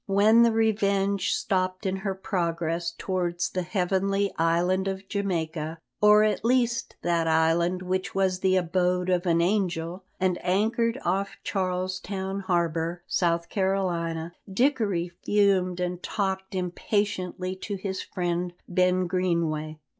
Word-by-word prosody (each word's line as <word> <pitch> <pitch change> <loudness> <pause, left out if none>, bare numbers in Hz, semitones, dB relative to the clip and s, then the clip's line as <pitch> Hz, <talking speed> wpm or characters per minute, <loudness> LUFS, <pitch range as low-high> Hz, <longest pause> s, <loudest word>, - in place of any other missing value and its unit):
When 210 +4 +5
the 235 -1 +5
Revenge 200 -3 +1
stopped 185 0 -1
in 190 0 0
her 190 0 -3
progress 170 -3 -2
towards 175 -2 -1
the 185 - -1
heavenly 195 +2 0
Island 175 +3 +1
of 195 0 -4
Jamaica, 165 -5 -2 0.2
or 210 0 +7
at 215 -1 +1
least 245 +1 +1
that 170 -1 +1
island 165 +3 +2
which 185 +3 -2
was 190 -1 +1
the 190 0 +2
abode 180 0 +1
of 180 0 +1
an 170 0 +3
angel, 180 -2 -1 0.2
and 185 -2 +1
anchored 225 +6 +1
off 195 +3 -1
Charles 185 -1 -1
Town 190 0 -4
harbour, 170 -2 -1
South 170 -1 0
Carolina, 175 -4 -1 0.2
Dickory 200 -7 +1
fumed 190 -3 +2
and 180 0 -2
talked 190 -1 -2
impatiently 185 0 -2
to 205 +2 -4
his 190 0 -4
friend 175 0 -2
Ben 180 0 +2
Greenway. 170 -4 -1
185 Hz, 130 wpm, -26 LUFS, 175-195 Hz, 0.2 s, or